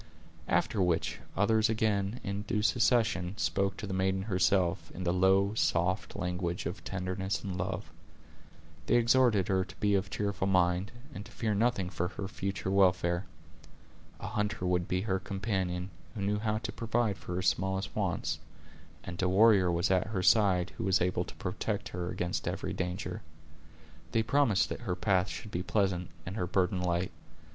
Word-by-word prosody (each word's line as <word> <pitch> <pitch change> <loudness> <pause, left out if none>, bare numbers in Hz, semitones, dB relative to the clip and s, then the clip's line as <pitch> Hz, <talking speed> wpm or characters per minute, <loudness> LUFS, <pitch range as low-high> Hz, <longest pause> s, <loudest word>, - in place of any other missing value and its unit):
After 95 +5 +1
which, 90 -3 0 0.2
others 110 +2 +3
again, 110 0 0
in 100 +1 -3
due 105 0 -1
succession, 105 -5 +2
spoke 100 0 0
to - - -5
the 95 - -4
maiden 95 0 +1
herself, 95 -3 +1
in 90 - -5
the 85 0 +1
low, 95 +2 +3
soft 90 -3 0
language 90 -1 -2
of - - -5
tenderness 95 +1 -3
and 95 -3 -4
love. 95 +2 -3 1.0
They - - +3
exhorted 120 -4 +4
her 95 -2 +2
to 90 - -12
be 105 -1 +1
of 95 0 +1
cheerful 100 -2 -1
mind, 90 0 +2 0.2
and 100 - -6
to - - -16
fear 110 -2 -1
nothing 100 -4 +1
for 90 -2 -1
her 95 +1 -5
future 95 -1 -3
welfare. 90 -2 +3 0.9
A - - -7
hunter 105 -3 -2
would 90 -1 +1
be 90 0 0
her 95 -2 0
companion, 95 -2 -2 0.2
who 105 - -4
knew 105 +1 0
how 110 0 0
to 110 - -4
provide 115 -3 -1
for 90 - -5
her 90 - -1
smallest 95 +1 0
wants; - - -1 0.6
and 85 +1 -5
a 95 - +2
warrior 100 -2 +5
was 85 +2 +1
at 95 0 +2
her 100 -4 -2
side 95 -4 +4
who - - -1
was 95 -2 +3
able 90 0 0
to - - -11
protect 100 +3 -3
he - - -8
against 90 0 -2
every - - -2
danger. 90 0 -3 0.9
They 115 - +3
promised 115 -6 +3
that - - -5
her 95 -7 -2
path 95 0 +2
should 95 +4 -7
be 90 - -2
pleasant, 90 -3 0 0.2
and 95 +4 -5
her 90 - -1
burden 95 +1 +1
light. 90 0 0
95 Hz, 175 wpm, -31 LUFS, 90-105 Hz, 1.0 s, warrior